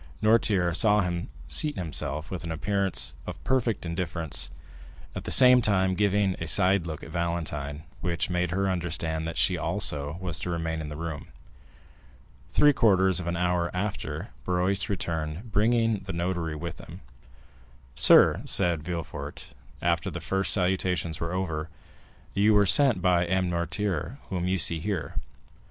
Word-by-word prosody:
Noirtier 100 -6 +2
saw 105 +1 +4
him 85 -2 -3 0.2
seat 150 -1 +4
himself 75 -2 -2
with 95 - -5
an 85 - -5
appearance 100 +3 -1
of - - -8
perfect 120 -7 -1
indifference, 85 -2 -1 0.6
at - - -7
the - - -4
same 125 -1 +8
time 95 -4 +2
giving 100 0 +1
a 85 - -3
side 95 +1 +3
look 80 -2 -6
at 80 - -10
Valentine, 80 -4 -3 0.2
which 85 -2 -2
made 90 -1 -1
her 95 +3 -1
understand 85 -3 -2
that 80 - -5
she - - +2
also 70 +2 -2
was 90 -3 -1
to - - -5
remain 80 -1 -3
in 75 - -6
the 75 - -7
room. 80 -3 -6 1.2
Three 145 +11 +4
quarters 95 - +3
of 90 - -6
an 85 0 -2
hour 90 -1 0
after, 90 -6 -4
Barrois 90 +2 0
returned, 85 +2 -4
bringing 115 +1 +2
the 95 0 -7
notary 85 -2 -2
with 85 +2 -7
him. - - -11 0.9
"Sir," - - +6
said 85 -4 +2
Villefort, 85 0 -7 0.3
after 85 -1 0
the - - -6
first 95 -1 0
salutations 90 -3 0
were 85 0 -3
over, 80 -4 -3 0.6
"you 105 +2 +3
were 105 -1 +5
sent 135 +4 +6
for 90 - -8
by 90 -1 +2
M. 95 0 0
Noirtier, 85 - -3
whom 90 -2 -2
you 95 +1 +1
see 85 -1 +3
here. 85 -5 -4
90 Hz, 155 wpm, -26 LUFS, 85-95 Hz, 1.2 s, same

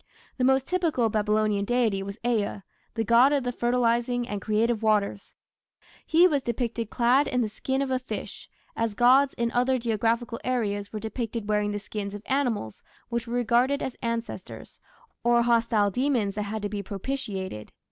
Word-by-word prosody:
The - - +1
most 265 +1 +3
typical 325 -11 +1
Babylonian 210 -1 +1
deity 225 -3 +1
was 200 +1 -6
Ea, 210 -4 0 0.3
the 225 - 0
god 235 +5 +5
of 280 -3 +1
the 245 - -1
fertilizing 240 0 +1
and 205 -1 -4
creative 220 +2 +1
waters. 210 -2 0 0.7
He 340 +3 +6
was 290 -5 +1
depicted 235 -2 -3
clad 255 +4 +3
in 250 - 0
the 225 - +1
skin 265 +6 -2
of 270 - -3
a 255 - +1
fish, 255 - -7 0.3
as 225 -2 -1
gods 260 +4 +5
in 235 0 -1
other 250 +2 +2
geographical 230 0 -1
areas 205 -5 -1
were 215 - -4
depicted 225 0 -4
wearing 210 -1 +1
the 205 - -2
skins 205 -1 -5
of 205 - -9
animals 245 - -1 0.3
which 235 0 -3
were 235 - -3
regarded 245 +4 +2
as 260 - -4
ancestors, 230 -5 -5 0.4
or 240 0 +4
hostile 230 -3 +2
demons 245 -4 0
that 210 - -3
had 215 0 -4
to 205 - -1
be 205 0 -3
propitiated. 195 - -5
235 Hz, 170 wpm, -26 LUFS, 210-250 Hz, 0.7 s, He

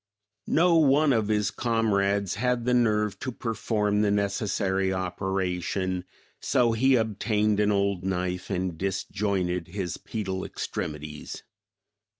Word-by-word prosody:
No 170 +1 +4
one 150 -1 +4
of 110 -3 +1
his 105 -1 +1
comrades 100 -4 +1
had 125 +2 0
the 125 - +2
nerve 105 -4 +2
to 130 - -3
perform 105 -3 -1
the 105 - +2
necessary 100 -2 0
operation, 95 0 -2 0.3
so 120 -2 +2
he 130 +4 +3
obtained 105 -2 +1
an 105 0 +3
old 100 -2 0
knife 90 -1 -2
and 90 -4 -2
disjointed 95 -2 -1
his 90 -2 -4
pedal 95 -4 -4
extremities. 75 0 -5
100 Hz, 120 wpm, -27 LUFS, 95-110 Hz, 0.3 s, No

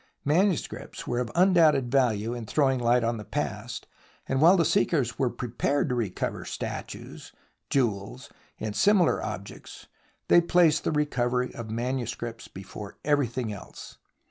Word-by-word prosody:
Manuscripts 175 +4 0
were 120 - -1
of 125 -2 -2
undoubted 165 -8 +4
value 120 -4 +1
in 120 -3 -6
throwing 135 -2 +2
light 120 0 +3
on 115 0 0
the 105 - -7
past, 105 - -4 0.4
and 135 +1 0
while 175 +5 +7
the 165 - +3
seekers 135 - +1
were 130 -3 +2
prepared 130 +5 -1
to - - 0
recover 115 -7 -2
statues, - - -7 0.4
jewels 120 -1 -1 0.3
and 110 -1 -4
similar 195 -4 +3
objects, 100 -2 -8 0.4
they 175 - +6
placed 170 -2 +3
the - - +1
recovery 125 -4 0
of 115 -2 -7
manuscripts 120 0 -3
before 100 +1 -9
everything 130 -6 0
else. 100 - -11
125 Hz, 140 wpm, -27 LUFS, 115-150 Hz, 0.4 s, while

